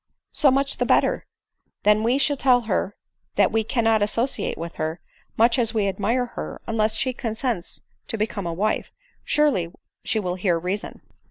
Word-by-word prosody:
" -, -, -62 dB
So 285 Hz, -, +7 dB
much 275 Hz, +1 st, +1 dB
the -, -, +1 dB
better; -, -, +2 dB, 0.6 s
then, 210 Hz, 0 st, +5 dB
when 215 Hz, -, -2 dB
we 245 Hz, +3 st, +3 dB
shall 285 Hz, +1 st, +2 dB
tell 255 Hz, -2 st, +4 dB
her 210 Hz, -2 st, -1 dB, 0.4 s
that -, -, +4 dB
we 225 Hz, 0 st, +1 dB
cannot 225 Hz, -1 st, +2 dB
associate 230 Hz, +5 st, 0 dB
with 170 Hz, +1 st, -7 dB
her, 160 Hz, +2 st, -2 dB, 0.4 s
much 235 Hz, +3 st, +4 dB
as 230 Hz, -1 st, +1 dB
we 210 Hz, -2 st, +2 dB
admire 220 Hz, +6 st, 0 dB
her, -, -, -6 dB
unless 220 Hz, -1 st, +2 dB
she 255 Hz, +2 st, 0 dB
consents 225 Hz, -5 st, -3 dB, 0.3 s
to 225 Hz, -, -3 dB
become 210 Hz, -3 st, -2 dB
a -, -, -1 dB
wife, 210 Hz, +5 st, -1 dB, 0.3 s
surely 270 Hz, -, +2 dB, 0.3 s
she 220 Hz, -, +1 dB
will 180 Hz, -3 st, -2 dB
hear 180 Hz, -2 st, +1 dB
reason." 185 Hz, +5 st, -4 dB
220 Hz, 180 wpm, -24 LUFS, 200-245 Hz, 0.6 s, So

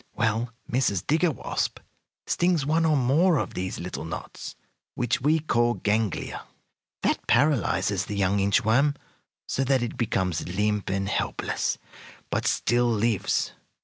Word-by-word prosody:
Well, 115 Hz, +1 st, 0 dB, 0.2 s
Mrs. 120 Hz, -8 st, 0 dB
Digger 165 Hz, +4 st, +3 dB
Wasp 150 Hz, -, -2 dB, 0.5 s
stings 175 Hz, -5 st, +1 dB
one 160 Hz, +3 st, +2 dB
or 155 Hz, -2 st, +3 dB
more 150 Hz, +7 st, +3 dB
of -, -, -2 dB
these 95 Hz, 0 st, -4 dB
little 90 Hz, -2 st, -5 dB
knots, 80 Hz, -, -7 dB, 0.4 s
which 125 Hz, 0 st, 0 dB
we 150 Hz, +4 st, +3 dB
call 120 Hz, -6 st, +1 dB
ganglia. 105 Hz, 0 st, -1 dB, 0.6 s
That -, -, 0 dB
paralyzes 145 Hz, -, +2 dB
the 105 Hz, -, -5 dB
young 100 Hz, 0 st, +2 dB
inch 100 Hz, +3 st, +2 dB
worm, 140 Hz, +6 st, +3 dB, 0.5 s
so 135 Hz, -, 0 dB
that 135 Hz, -2 st, +2 dB
it 120 Hz, -, -4 dB
becomes 95 Hz, -7 st, -1 dB
limp 105 Hz, +3 st, 0 dB
and 95 Hz, 0 st, -1 dB
helpless, -, -, -1 dB, 0.5 s
but -, -, 0 dB
still 120 Hz, 0 st, +2 dB
lives. 110 Hz, -2 st, +1 dB
120 Hz, 140 wpm, -26 LUFS, 100-140 Hz, 0.6 s, Digger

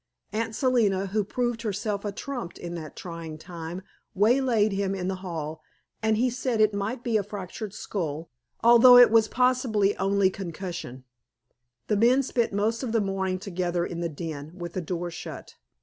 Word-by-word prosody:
Aunt 225 Hz, 0 st, -2 dB
Selina, 225 Hz, -8 st, +2 dB
who 205 Hz, +2 st, 0 dB
proved 240 Hz, +2 st, -2 dB
herself 210 Hz, -1 st, -2 dB
a 205 Hz, -, -2 dB
trump 225 Hz, -4 st, -6 dB
in 175 Hz, 0 st, -6 dB
that 160 Hz, -3 st, -7 dB
trying 165 Hz, -3 st, -7 dB
time, 170 Hz, +2 st, -7 dB, 0.3 s
waylaid 225 Hz, 0 st, +3 dB
him 195 Hz, 0 st, -1 dB
in 185 Hz, -1 st, -3 dB
the 190 Hz, 0 st, -2 dB
hall, 160 Hz, -4 st, -5 dB, 0.4 s
and 220 Hz, -1 st, +2 dB
he 245 Hz, +3 st, +3 dB
said 245 Hz, -1 st, -1 dB
it 215 Hz, -1 st, +4 dB
might 215 Hz, +5 st, -3 dB
be 230 Hz, -2 st, +2 dB
a 205 Hz, -, 0 dB
fractured 205 Hz, +1 st, -6 dB
skull, 165 Hz, -7 st, -4 dB, 0.3 s
although 240 Hz, +2 st, +9 dB
it 245 Hz, -2 st, +8 dB
was 225 Hz, -1 st, +5 dB
possibly 245 Hz, -5 st, +2 dB
only 195 Hz, 0 st, +2 dB
concussion. 170 Hz, -9 st, -6 dB, 0.8 s
The 210 Hz, -, +1 dB
men 245 Hz, +5 st, +4 dB
spent 240 Hz, -3 st, 0 dB
most 215 Hz, +3 st, 0 dB
of 245 Hz, -4 st, -3 dB
the 230 Hz, -, +3 dB
morning 195 Hz, -2 st, -1 dB
together 180 Hz, -3 st, -2 dB
in 170 Hz, -, -5 dB
the 170 Hz, -1 st, -1 dB
den, 155 Hz, -1 st, -6 dB
with 175 Hz, -1 st, -6 dB
the 185 Hz, -, -2 dB
door 175 Hz, +1 st, -4 dB
shut. 175 Hz, -, -8 dB
200 Hz, 175 wpm, -26 LUFS, 175-230 Hz, 0.8 s, although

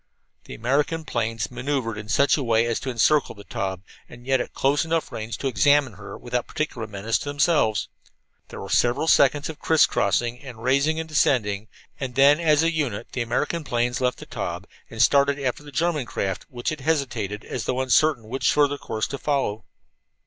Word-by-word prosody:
The -, -, -8 dB
American 145 Hz, +7 st, 0 dB
planes 115 Hz, -3 st, -2 dB
maneuvered 130 Hz, -5 st, -2 dB
in 105 Hz, 0 st, -8 dB
such 140 Hz, +5 st, +4 dB
a 150 Hz, -, -2 dB
way 115 Hz, -2 st, +2 dB
as 115 Hz, -1 st, -1 dB
to 135 Hz, -, -5 dB
encircle 130 Hz, +4 st, +2 dB
the 100 Hz, -, -12 dB
Taube, 95 Hz, -2 st, -4 dB, 0.3 s
and 120 Hz, 0 st, -13 dB
yet 130 Hz, -1 st, +2 dB
at -, -, -6 dB
close 140 Hz, +1 st, +2 dB
enough 165 Hz, 0 st, -1 dB
range 110 Hz, +1 st, -5 dB
to -, -, -7 dB
examine 145 Hz, -1 st, +3 dB
her 100 Hz, 0 st, -9 dB
without 125 Hz, -1 st, -3 dB
particular 125 Hz, -7 st, -3 dB
menace 105 Hz, +2 st, -1 dB
to 145 Hz, -, -5 dB
themselves. 145 Hz, -7 st, +2 dB, 0.6 s
There -, -, -9 dB
were -, -, -7 dB
several 120 Hz, +6 st, +2 dB
seconds 145 Hz, -1 st, +4 dB
of 160 Hz, -1 st, -8 dB
criss 160 Hz, -3 st, +4 dB
crossing 120 Hz, +5 st, 0 dB
and 120 Hz, -5 st, -11 dB
rising 140 Hz, +5 st, +2 dB
and 160 Hz, -, -4 dB
descending, 110 Hz, -9 st, +1 dB, 0.3 s
and 130 Hz, -4 st, -5 dB
then 140 Hz, +3 st, +6 dB
as 155 Hz, -2 st, +3 dB
a 165 Hz, +1 st, +1 dB
unit 130 Hz, -9 st, -2 dB
the 125 Hz, -, -3 dB
American 150 Hz, +8 st, -1 dB
planes 120 Hz, -1 st, -1 dB
left 125 Hz, 0 st, +1 dB
the -, -, -10 dB
Taube -, -, -5 dB, 0.2 s
and 110 Hz, -, -10 dB
started 140 Hz, +4 st, +4 dB
after 135 Hz, -1 st, -2 dB
the 145 Hz, -1 st, -12 dB
German 150 Hz, -2 st, 0 dB
craft, 95 Hz, -3 st, -3 dB
which 120 Hz, -1 st, -3 dB
had 155 Hz, -3 st, -5 dB
hesitated, 120 Hz, -9 st, -2 dB
as 120 Hz, -, -4 dB
though 130 Hz, -, -1 dB
uncertain 130 Hz, 0 st, +3 dB
what 125 Hz, +5 st, -6 dB
further 145 Hz, -1 st, +3 dB
course 110 Hz, 0 st, -3 dB
to 140 Hz, -, -6 dB
follow. 135 Hz, -7 st, -1 dB
130 Hz, 195 wpm, -24 LUFS, 115-145 Hz, 0.6 s, then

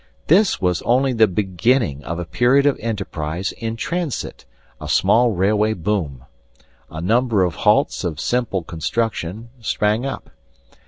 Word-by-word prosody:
This 190 Hz, +5 st, +3 dB
was 90 Hz, -3 st, 0 dB
only 130 Hz, +2 st, +2 dB
the 110 Hz, -2 st, +4 dB
beginning 95 Hz, -, 0 dB
of 85 Hz, -, -4 dB
a 90 Hz, -, -4 dB
period 125 Hz, -, +3 dB
of 145 Hz, -, +3 dB
enterprise 95 Hz, -5 st, -3 dB
in 115 Hz, -1 st, -5 dB
transit, 160 Hz, +4 st, -4 dB, 0.4 s
a -, -, -6 dB
small 120 Hz, +1 st, +4 dB
railway 105 Hz, +2 st, +1 dB
boom. 80 Hz, -9 st, -3 dB, 0.6 s
A 80 Hz, -, -7 dB
number 110 Hz, +3 st, +2 dB
of 90 Hz, -2 st, 0 dB
halts -, -, +2 dB
of 80 Hz, -4 st, -3 dB
simple 120 Hz, -6 st, -1 dB
construction 105 Hz, +4 st, -3 dB
sprang 110 Hz, +1 st, 0 dB
up. 135 Hz, 0 st, -6 dB
105 Hz, 140 wpm, -20 LUFS, 90-120 Hz, 0.6 s, the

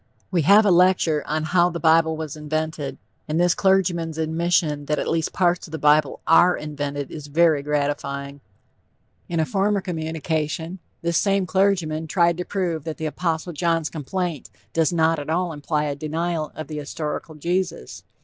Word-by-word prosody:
We 175 Hz, -3 st, +2 dB
have 200 Hz, +8 st, +6 dB
a 200 Hz, -, +4 dB
lecture 175 Hz, -4 st, +3 dB
on 155 Hz, +2 st, -1 dB
"How 175 Hz, +2 st, +3 dB
the 170 Hz, -1 st, -5 dB
Bible 160 Hz, -1 st, +3 dB
was 155 Hz, -2 st, -5 dB
Invented," 155 Hz, -2 st, -3 dB, 0.3 s
and 155 Hz, +2 st, -1 dB
this 175 Hz, 0 st, +4 dB
clergyman's 175 Hz, -4 st, +1 dB
admission 160 Hz, -2 st, 0 dB
that 150 Hz, +1 st, 0 dB
at -, -, -2 dB
least 165 Hz, -1 st, 0 dB
parts 175 Hz, -1 st, +1 dB
of -, -, -15 dB
the -, -, -2 dB
bible 150 Hz, +1 st, +3 dB
are 175 Hz, +2 st, +5 dB
invented 145 Hz, -2 st, -4 dB
is 150 Hz, -2 st, -8 dB
very 155 Hz, 0 st, +3 dB
gratifying. 140 Hz, -1 st, -2 dB, 0.9 s
In 170 Hz, -, -1 dB
a 160 Hz, -, +2 dB
former 200 Hz, +3 st, +1 dB
communication, 160 Hz, 0 st, -3 dB, 0.2 s
this 170 Hz, 0 st, +2 dB
same 195 Hz, -2 st, +1 dB
clergyman 180 Hz, -5 st, +1 dB
tried 170 Hz, +1 st, +2 dB
to 180 Hz, -, -3 dB
prove 175 Hz, -6 st, -2 dB
that 160 Hz, -1 st, -5 dB
the 160 Hz, -, -4 dB
Apostle 165 Hz, +2 st, -2 dB
John's 165 Hz, 0 st, 0 dB
complaint 165 Hz, 0 st, -4 dB, 0.2 s
does 165 Hz, -1 st, +2 dB
not 165 Hz, -1 st, +2 dB
at 145 Hz, -, -7 dB
all 175 Hz, +1 st, 0 dB
imply 150 Hz, 0 st, -1 dB
a 145 Hz, -1 st, -2 dB
denial 160 Hz, +2 st, -2 dB
of 155 Hz, -, -6 dB
the 155 Hz, -, -6 dB
historical 150 Hz, +2 st, -5 dB
Jesus. 175 Hz, -, -3 dB
160 Hz, 170 wpm, -23 LUFS, 150-175 Hz, 0.9 s, have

